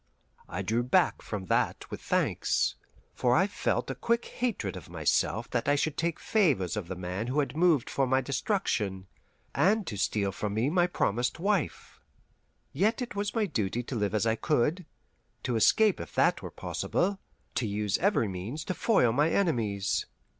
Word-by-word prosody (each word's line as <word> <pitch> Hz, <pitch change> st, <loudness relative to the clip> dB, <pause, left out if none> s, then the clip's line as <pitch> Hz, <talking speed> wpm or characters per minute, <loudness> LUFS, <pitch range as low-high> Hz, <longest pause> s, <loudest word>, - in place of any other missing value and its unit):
I 95 Hz, +2 st, -3 dB
drew 115 Hz, +5 st, +1 dB
back 135 Hz, +10 st, +2 dB
from 100 Hz, -3 st, -5 dB
that -, -, 0 dB
with -, -, -6 dB
thanks, -, -, +1 dB, 0.4 s
for 125 Hz, 0 st, +2 dB
I 185 Hz, -, +4 dB
felt 205 Hz, -, -1 dB
a -, -, -2 dB
quick 235 Hz, 0 st, 0 dB
hatred 220 Hz, -, -2 dB
of -, -, -9 dB
myself 115 Hz, +2 st, 0 dB
that 120 Hz, +1 st, -1 dB
I 145 Hz, -, +4 dB
should 145 Hz, +1 st, 0 dB
take 170 Hz, +1 st, -1 dB
favours 140 Hz, -, +1 dB
of 105 Hz, -5 st, -4 dB
the 95 Hz, -, -5 dB
man 90 Hz, +5 st, -4 dB
who 135 Hz, +4 st, 0 dB
had 145 Hz, 0 st, -1 dB
moved 165 Hz, -6 st, +3 dB
for 135 Hz, -1 st, 0 dB
my 130 Hz, +1 st, +3 dB
destruction, 125 Hz, -, -1 dB, 0.5 s
and 200 Hz, +8 st, +3 dB
to 105 Hz, -, -5 dB
steal 100 Hz, 0 st, 0 dB
from 105 Hz, +1 st, -3 dB
me 120 Hz, +7 st, +1 dB
my 175 Hz, 0 st, +3 dB
promised 125 Hz, -, 0 dB
wife. 195 Hz, -2 st, -1 dB, 0.7 s
Yet 210 Hz, -, +1 dB
it 240 Hz, -, -7 dB
was 205 Hz, +2 st, -2 dB
my 225 Hz, -2 st, +2 dB
duty 120 Hz, -, -2 dB
to 125 Hz, -, -5 dB
live 105 Hz, -2 st, 0 dB
if 110 Hz, -, +1 dB
I 110 Hz, -, +3 dB
could, 150 Hz, -, 0 dB, 0.6 s
to 125 Hz, -3 st, -1 dB
escape 210 Hz, -, +4 dB
if -, -, -8 dB
that -, -, +3 dB
were -, -, -6 dB
possible, 195 Hz, +2 st, -2 dB, 0.3 s
to 115 Hz, -, -1 dB
use 105 Hz, -1 st, -1 dB
every 195 Hz, -, +2 dB
means 100 Hz, -, -5 dB
to -, -, -2 dB
foil 180 Hz, -, +3 dB
my 145 Hz, +7 st, +2 dB
enemies. 110 Hz, -, 0 dB
130 Hz, 180 wpm, -29 LUFS, -, 0.7 s, I